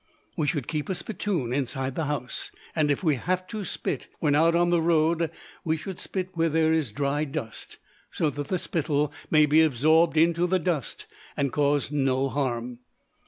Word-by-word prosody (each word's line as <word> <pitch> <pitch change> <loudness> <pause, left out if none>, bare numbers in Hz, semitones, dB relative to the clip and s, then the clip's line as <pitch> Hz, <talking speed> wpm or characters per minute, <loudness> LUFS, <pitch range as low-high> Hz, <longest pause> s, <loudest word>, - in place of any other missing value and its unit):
We 155 -4 0
should 145 -6 -1
keep 155 +1 -3
a 190 - 0
spittoon 175 - -2
inside 135 0 -1
the 160 +3 -2
house, 140 -3 -3 0.2
and 155 -2 +2
if 145 - 0
we 155 -5 +2
have 185 +7 -1
to 215 0 -4
spit - - -3
when 150 -3 +1
out 165 +3 +4
on 175 0 +3
the 170 -1 +3
road 165 0 +2 0.3
we 160 0 0
should 175 +4 -7
spit 185 -1 -3
where 165 0 +1
there 160 0 +2
is 155 -8 0
dry 140 +4 0
dust, 135 -7 -6 0.3
so 155 - 0
that 145 +1 -5
the 185 - 0
spittle 150 -3 -1 0.2
may 155 -1 +5
be 150 +2 +5
absorbed 160 +3 +3
into 170 +2 +3
the 185 +1 +2
dust 170 -5 -2 0.3
and 140 -3 0
cause 145 -1 +1
no 135 -2 +1
harm. 125 -3 -2
155 Hz, 185 wpm, -26 LUFS, 140-170 Hz, 0.3 s, may